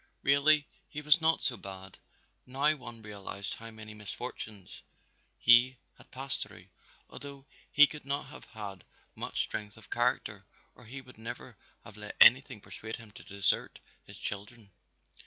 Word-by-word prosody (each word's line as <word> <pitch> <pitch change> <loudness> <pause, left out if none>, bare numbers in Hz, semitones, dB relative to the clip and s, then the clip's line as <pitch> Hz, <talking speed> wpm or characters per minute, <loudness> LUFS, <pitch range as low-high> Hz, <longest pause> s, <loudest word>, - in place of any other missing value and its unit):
Really 145 +1 +5 0.2
he 150 - -5
was 150 +2 +6
not 160 0 +3
so 120 - 0
bad, 95 -1 -10 0.5
now 140 +4 +2
one 120 -5 -10
realized 100 -1 -4
how 115 0 -8
many 110 -1 -10
misfortunes 105 -1 -7 0.6
he 120 +2 +6 0.2
had - - -19
passed 135 +1 -4
through, 95 -3 -8 0.4
although 140 -1 -10 0.3
he 150 - +9
could 150 0 -8
not 140 +1 -1
have - - -11
had 100 -4 -8 0.3
much - - 0
strength 105 -1 -5
of - - -16
character - - 0 0.3
or 125 - -17
he 135 +5 -8
would 125 -3 -16
never 115 - -7 0.3
have 105 - -13
let 105 0 -8
anything 130 -1 +7
persuade 110 +2 -6
him 115 -2 -13
to - - -13
desert 100 -2 +1 0.3
his - - -12
children. 105 +1 -6
115 Hz, 155 wpm, -31 LUFS, 105-135 Hz, 0.6 s, he